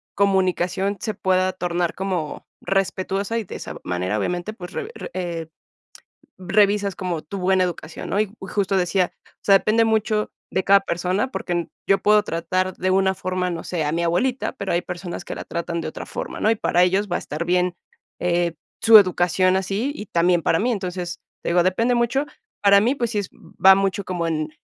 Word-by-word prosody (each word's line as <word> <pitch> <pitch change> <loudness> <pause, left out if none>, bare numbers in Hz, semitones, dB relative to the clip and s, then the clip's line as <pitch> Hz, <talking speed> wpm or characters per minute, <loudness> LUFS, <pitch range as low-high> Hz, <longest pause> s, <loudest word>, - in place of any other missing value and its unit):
comunicación 190 0 +1
se 215 0 -3
pueda 185 -2 +1
tornar 175 -1 -1
como 185 -6 -3
respetuosa 195 +2 -1
y 225 - -1
de - - -9
esa - - -7
manera, 90 +4 -1
obviamente, 180 - -2
pues, 180 -4 -9
re 435 - -4 0.2
eh 170 -3 -4 0.9
revisas 200 +1 +2
como 175 -4 -3
tu 195 +6 -7
buena 185 0 +2
educación, 165 -2 -6
¿no? 200 - 0
Y 210 -2 0
justo 195 0 -1
decía, 180 0 +1 0.2
o - - -29
sea, 195 - +6
depende 225 +1 +2
mucho 215 -1 +1 0.2
de 190 - 0
cada 200 0 +6
persona, 185 +6 -1
porque 175 -1 -2 0.2
yo 195 - +4
puedo 210 0 +4
tratar 185 +2 -1
de 185 - 0
una 190 0 +3
forma, 185 -1 -2
no 165 - -5
sé, 170 -4 -2
a 150 - 0
mi 170 +1 0
abuelita, 245 +10 0
pero 200 -7 -4
hay 175 - +2
personas 175 0 -6
que - - -5
la - - -6
tratan 170 0 -3
de 155 - -4
otra - - -8
forma, - - -5
¿no? 215 - +3
Y - - +2
para 180 -3 +1
ellos 195 +3 +2
va - - +2
a - - -4
estar 155 +3 -5
bien, 180 0 +1 0.4
eh, 175 -1 0 0.3
su 225 -1 +9
educación 185 -1 +3
así, 200 +8 -1
y 210 - -7
también 175 0 +2
para 165 - +2
mí. 245 +3 +1
Entonces, 180 -4 -4 0.2
te - - -1
digo, 175 +1 +4
depende 230 +7 +2
mucho. 245 +5 +1 0.4
Para 200 0 +7
mí, 250 +6 +2
pues, 235 -3 -2
sí 210 - 0
es 200 - -4
va 190 0 +4
mucho 195 0 0
como 175 -2 -2
en 155 -1 -1
185 Hz, 195 wpm, -22 LUFS, 175-200 Hz, 0.9 s, su